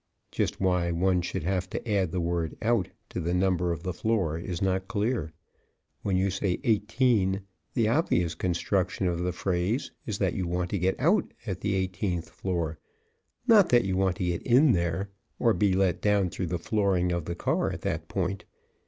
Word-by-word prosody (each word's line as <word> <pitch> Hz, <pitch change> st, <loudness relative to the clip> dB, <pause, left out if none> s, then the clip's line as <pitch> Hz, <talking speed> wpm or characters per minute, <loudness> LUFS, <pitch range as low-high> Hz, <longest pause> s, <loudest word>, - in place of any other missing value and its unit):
(Just -, -, -1 dB
why 90 Hz, -2 st, +2 dB
one 90 Hz, +2 st, +2 dB
should 90 Hz, -1 st, -3 dB
have 90 Hz, +1 st, -1 dB
to -, -, -5 dB
add 100 Hz, -5 st, +1 dB
the 90 Hz, -, -1 dB
word 85 Hz, -2 st, -1 dB
"out" 110 Hz, -5 st, +2 dB, 0.2 s
to -, -, -4 dB
the 85 Hz, +1 st, -1 dB
number 90 Hz, -2 st, +2 dB
of 85 Hz, 0 st, -4 dB
the 90 Hz, -2 st, -2 dB
floor 95 Hz, -5 st, 0 dB
is 85 Hz, 0 st, -4 dB
not 95 Hz, 0 st, 0 dB
clear. 110 Hz, -, -1 dB, 0.7 s
When 95 Hz, -2 st, 0 dB
you 95 Hz, +1 st, +1 dB
say 95 Hz, -1 st, -1 dB
"eighteen" 105 Hz, -3 st, +2 dB, 0.3 s
the 115 Hz, -3 st, +3 dB
obvious 100 Hz, -, +2 dB
construction 90 Hz, +1 st, 0 dB
of 85 Hz, -1 st, -1 dB
the 90 Hz, +1 st, 0 dB
phrase 90 Hz, +7 st, -1 dB, 0.2 s
is 105 Hz, -3 st, -2 dB
that 95 Hz, -4 st, +1 dB
you 90 Hz, -2 st, -2 dB
want 90 Hz, 0 st, -2 dB
to 100 Hz, -, 0 dB
get 95 Hz, +2 st, +1 dB
out 175 Hz, +7 st, +2 dB
at 95 Hz, -5 st, -4 dB
the 100 Hz, -1 st, 0 dB
eighteenth 95 Hz, -2 st, -2 dB
floor, 85 Hz, -4 st, -3 dB, 0.7 s
not 220 Hz, -6 st, +6 dB
that 120 Hz, -3 st, +4 dB
you 95 Hz, -1 st, 0 dB
want 95 Hz, -1 st, +2 dB
to 90 Hz, -, -2 dB
get 85 Hz, -1 st, -1 dB
in 130 Hz, +4 st, +5 dB
there 85 Hz, +1 st, -1 dB, 0.3 s
or 115 Hz, -2 st, +3 dB
be 100 Hz, -3 st, +2 dB
let 95 Hz, -2 st, +1 dB
down 100 Hz, -3 st, +2 dB
through 95 Hz, -, -3 dB
the 90 Hz, +2 st, -1 dB
flooring 95 Hz, -1 st, +1 dB
of 85 Hz, -3 st, -2 dB
the 85 Hz, -, -3 dB
car -, -, 0 dB
at -, -, -6 dB
that -, -, -3 dB
point. 95 Hz, 0 st, -2 dB
95 Hz, 195 wpm, -28 LUFS, 90-105 Hz, 0.7 s, not